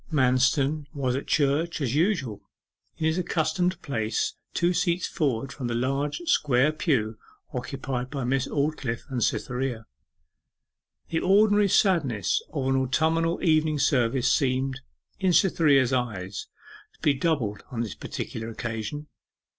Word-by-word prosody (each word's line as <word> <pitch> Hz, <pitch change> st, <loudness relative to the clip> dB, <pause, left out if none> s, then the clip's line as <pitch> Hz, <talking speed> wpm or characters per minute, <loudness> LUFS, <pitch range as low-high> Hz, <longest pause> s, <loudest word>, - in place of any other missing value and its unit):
Manston 135 Hz, +2 st, +2 dB
was 130 Hz, -3 st, 0 dB
at 135 Hz, -, -4 dB
church 150 Hz, +4 st, +1 dB
as 130 Hz, -5 st, -1 dB
usual 150 Hz, -, 0 dB, 0.6 s
in 155 Hz, -, -2 dB
his 160 Hz, +3 st, +1 dB
accustomed 180 Hz, +1 st, 0 dB
place 110 Hz, -5 st, -1 dB, 0.2 s
two 175 Hz, +1 st, +2 dB
seats 175 Hz, 0 st, +1 dB
forward 135 Hz, -6 st, -1 dB
from 130 Hz, -4 st, -4 dB
the 120 Hz, -, -2 dB
large 135 Hz, -, -1 dB
square 145 Hz, -, +3 dB
pew 115 Hz, -9 st, 0 dB, 0.3 s
occupied 130 Hz, 0 st, -4 dB
by 140 Hz, -2 st, -4 dB
Miss 130 Hz, +1 st, 0 dB
Aldclyffe 140 Hz, -5 st, -2 dB
and 125 Hz, -3 st, 0 dB
Cytherea. 125 Hz, -2 st, -2 dB, 1.2 s
The 165 Hz, -, 0 dB
ordinary 205 Hz, +2 st, +4 dB
sadness 145 Hz, -, +2 dB
of 135 Hz, -4 st, -1 dB
an 135 Hz, -, +2 dB
autumnal 160 Hz, +6 st, +1 dB
evening 155 Hz, -2 st, +3 dB
service 125 Hz, -3 st, +2 dB
seemed, 130 Hz, 0 st, 0 dB, 0.4 s
in 190 Hz, -2 st, +2 dB
Cytherea's 145 Hz, -, +4 dB
eyes, 105 Hz, -7 st, -3 dB, 0.5 s
to -, -, -29 dB
be 145 Hz, -, +3 dB
doubled 135 Hz, -9 st, -1 dB
on 120 Hz, -3 st, -3 dB
this 110 Hz, -5 st, -3 dB
particular 115 Hz, 0 st, -6 dB
occasion. 115 Hz, +5 st, -5 dB
135 Hz, 130 wpm, -26 LUFS, 125-160 Hz, 1.2 s, ordinary